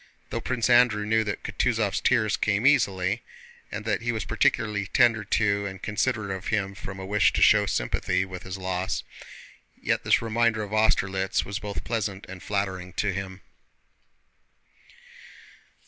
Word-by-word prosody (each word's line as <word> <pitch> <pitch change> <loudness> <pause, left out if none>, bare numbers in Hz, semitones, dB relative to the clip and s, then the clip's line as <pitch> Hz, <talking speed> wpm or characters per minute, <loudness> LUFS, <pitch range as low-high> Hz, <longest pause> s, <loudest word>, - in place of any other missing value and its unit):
Though - - -2
Prince 120 -3 -1
Andrew 120 -4 +4
knew 110 +1 +2
that 100 - -4
Kutúzov's 115 -5 0
tears 110 -5 +2
came 105 +3 0
easily, 105 -6 +2 0.5
and 105 +1 -5
that 105 -2 0
he 120 +1 -1
was 110 -3 -3
particularly 105 -2 0
tender 115 0 +3
to 100 0 +1
and 95 -1 -7
considerate 110 0 -1
of 95 - -8
him 100 -3 -1
from 95 -2 -8
a 95 - -6
wish 100 0 +3
to - - 0
show - - +5
sympathy 90 +10 0
with 90 -1 -8
his 95 +1 -6
loss, 95 0 -2 0.8
yet - - 0
this - - +4
reminder 115 -1 +1
of 105 0 -7
Austerlitz 95 -3 +1
was 100 +2 -4
both 105 -2 -5
pleasant 105 -4 -3
and 95 -1 -9
flattering 95 -3 -3
to 100 0 0
him. 95 0 -6
100 Hz, 155 wpm, -26 LUFS, 95-110 Hz, 0.8 s, show